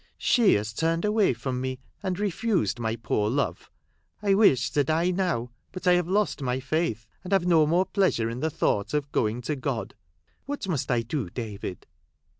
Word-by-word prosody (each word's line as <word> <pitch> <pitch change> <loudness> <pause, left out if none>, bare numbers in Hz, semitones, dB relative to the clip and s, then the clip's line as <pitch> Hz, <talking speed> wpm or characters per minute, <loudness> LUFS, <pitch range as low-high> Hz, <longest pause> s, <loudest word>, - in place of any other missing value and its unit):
She 235 -5 +4
has 105 +2 -2
turned 165 - 0
away 210 -1 +3
from 125 +1 -3
me, 130 0 -3 0.2
and 185 -2 -2
refused 205 - 0
my 110 -1 -1
poor 105 -2 -1
love. 140 +4 -2 0.5
I 200 -1 +2
wish 170 - +4
to 145 - +2
die 160 +5 +1
now; 175 -11 -1 0.2
but 185 0 -8
I 180 - +6
have 175 -1 +2
lost 200 -4 0
my 130 -1 -1
faith, 135 -5 -1 0.2
and 185 - -8
have 195 -3 +3
no 165 -4 +4
more 175 +4 +3
pleasure 190 - +1
in 115 +2 -4
the 160 - 0
thought 105 -4 0
of 145 -1 -2
going 110 +2 0
to 150 +5 -1
God. 130 -3 -3 0.5
What 285 -7 -4
must 160 -8 -2
I 120 -2 +2
do, 120 - -3
David 105 -4 -6
150 Hz, 190 wpm, -26 LUFS, 120-185 Hz, 0.5 s, I